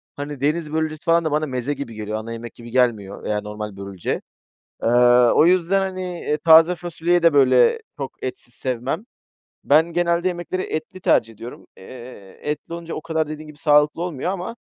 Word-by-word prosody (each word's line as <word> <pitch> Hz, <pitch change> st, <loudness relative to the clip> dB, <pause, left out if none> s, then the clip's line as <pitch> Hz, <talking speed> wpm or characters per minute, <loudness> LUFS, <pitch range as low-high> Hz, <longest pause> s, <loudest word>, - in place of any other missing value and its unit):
hani, 145 Hz, -1 st, -6 dB
deniz 155 Hz, +2 st, -1 dB
börülcesi 155 Hz, -1 st, -2 dB
falan 165 Hz, 0 st, +3 dB
da 155 Hz, -, 0 dB
bana 155 Hz, +1 st, +1 dB
meze 130 Hz, +1 st, -2 dB
gibi 140 Hz, -5 st, -7 dB
geliyor, 110 Hz, 0 st, -4 dB
ana 115 Hz, +1 st, -7 dB
yemek 115 Hz, 0 st, -7 dB
gibi 120 Hz, 0 st, -12 dB
gelmiyor 115 Hz, -6 st, 0 dB
veya 105 Hz, 0 st, -1 dB
normal 105 Hz, -1 st, -7 dB
börülce. 100 Hz, -2 st, -4 dB, 0.6 s
Eee, -, -, +2 dB, 0.4 s
o -, -, +5 dB
yüzden 180 Hz, +2 st, +3 dB
hani, 190 Hz, -1 st, -3 dB, 0.2 s
eee, 150 Hz, -, -1 dB
taze 160 Hz, +3 st, +6 dB
fasulyeyi 175 Hz, 0 st, -1 dB
de, 165 Hz, -2 st, +5 dB
böyle, 465 Hz, -, +5 dB, 0.2 s
çok 135 Hz, -2 st, -7 dB
etsiz 125 Hz, -2 st, -6 dB
sevmem. 130 Hz, -, -3 dB, 0.6 s
Ben 160 Hz, +4 st, +4 dB
genelde 170 Hz, +1 st, +1 dB
yemekleri 180 Hz, +1 st, -3 dB
etli 155 Hz, +4 st, -5 dB
tercih 115 Hz, -9 st, +2 dB
ediyorum, 115 Hz, +3 st, -10 dB
eee, 120 Hz, -2 st, -12 dB
etli 150 Hz, +3 st, -4 dB
olunca 170 Hz, -1 st, -6 dB
o -, -, -4 dB
kadar 160 Hz, -2 st, -1 dB
dediğin 155 Hz, 0 st, -7 dB
gibi 150 Hz, -1 st, -13 dB
sağlıklı 150 Hz, +1 st, +3 dB
olmuyor 175 Hz, -1 st, -3 dB
ama 190 Hz, +4 st, -5 dB
150 Hz, 180 wpm, -22 LUFS, 120-170 Hz, 0.6 s, taze